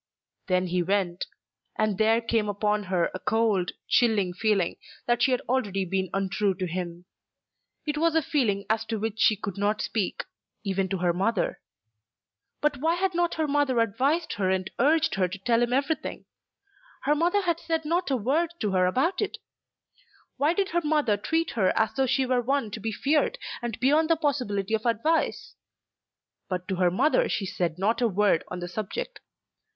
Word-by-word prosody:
Then 185 -1 +2
he 180 0 0
went; 185 -1 -1 0.5
and 215 -3 0
there 225 +1 +4
came 225 -2 0
upon 210 0 0
her 185 -2 0
a 185 - -5
cold, 215 -5 +1
chilling 215 -7 +2
feeling 195 -2 +1 0.3
that 240 0 +1
she 270 - +4
had 250 -1 +1
already 205 -7 -1
been 190 0 -1
untrue 195 0 0
to 185 - -3
him. 175 0 -5 0.8
It 300 -1 -2
was 330 0 +2
a 320 - +3
feeling 210 -10 0
as 220 0 +1
to 225 - -2
which 220 +1 -3
she 220 - +5
could 200 -2 -6
not 210 +1 +1
speak, 210 -4 -2 0.4
even 195 -2 -1
to 195 - -1
her 175 -1 +1
mother. 195 +3 0 1.0
But 295 -1 +1
why 320 +5 +1
had 375 +1 0
not 345 0 +1
her 315 -1 0
mother 285 -3 +1
advised 270 +9 +1
her 190 -2 +1
and 190 0 -1
urged 315 +5 +3
her 190 -2 +1
to 185 +3 -7
tell 230 +4 +1
him 240 0 +1
everything? 280 +5 -1 0.8
Her 290 - +3
mother 345 +6 +2
had 340 -2 0
said 325 -2 -2
not 345 +3 0
a 265 - +2
word 295 +10 +1
to 210 -3 0
her 185 -1 +3
about 305 - +1
it. 415 - -2 1.0
Why 305 +4 +2
did 390 0 0
her 345 +1 +1
mother 295 -8 +2
treat 325 +11 -1
her 200 -5 +1
as 220 -1 +2
though 265 +3 +1
she 265 +2 +2
were 255 -1 +1
one 265 -3 -1
to 215 - -5
be 220 +1 -3
feared, 295 - +1 0.2
and 240 -2 -4
beyond 300 +6 +3
the 330 - +5
possibility 250 - -1
of 220 +2 0
advice? 235 +9 0 1.0
But 180 -1 -3
to 190 - -1
her 180 -1 +3
mother 300 - +2
she 200 - -1
said 175 -3 -2
not 210 +6 +1
a 240 - +4
word 200 -4 +2
on 180 - -6
the 175 - -4
subject. 215 - -5
225 Hz, 190 wpm, -26 LUFS, 195-290 Hz, 1.0 s, she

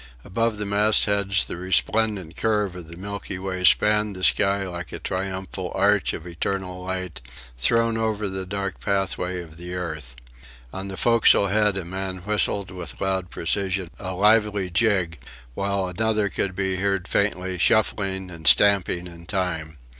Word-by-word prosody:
Above 115 +2 0
the 105 - -2
mastheads 100 -1 +3
the - - -6
resplendent 95 0 +1
curve 105 -4 0
of 90 -3 -9
the 85 +1 -11
Milky 100 0 -5
Way 95 -1 -4
spanned 105 +2 +4
the 95 - -8
sky 100 0 +2
like 85 -2 -6
a - - -5
triumphal 95 -1 -4
arch 100 +1 +2
of 80 - -7
eternal 90 +1 -4
light, 90 -5 -4 0.4
thrown 115 - +2
over 110 -2 -1
the 95 0 -4
dark 100 -1 -4
pathway 95 -2 -1
of 80 -1 -14
the 90 +1 -6
earth. 80 -8 -5 0.6
On 95 +1 -5
the 95 -1 -6
forecastle 115 -4 +5
head 105 0 +2
a 95 - -3
man 95 +1 -4
whistled 100 -2 0
with 90 -5 -7
loud 95 -2 -1
precision 95 +1 -1
a 95 -1 -4
lively 105 -1 +3
jig, 90 - +1 0.3
while 100 +3 -1
another 105 +2 0
could 95 -1 -2
be 95 -1 -1
heard 95 -1 -1
faintly, 95 -3 0
shuffling 95 -2 +1
and 80 -3 -6
stamping 90 +5 +5
in 85 -1 -11
time. 80 -6 -2
95 Hz, 155 wpm, -24 LUFS, 90-100 Hz, 0.6 s, forecastle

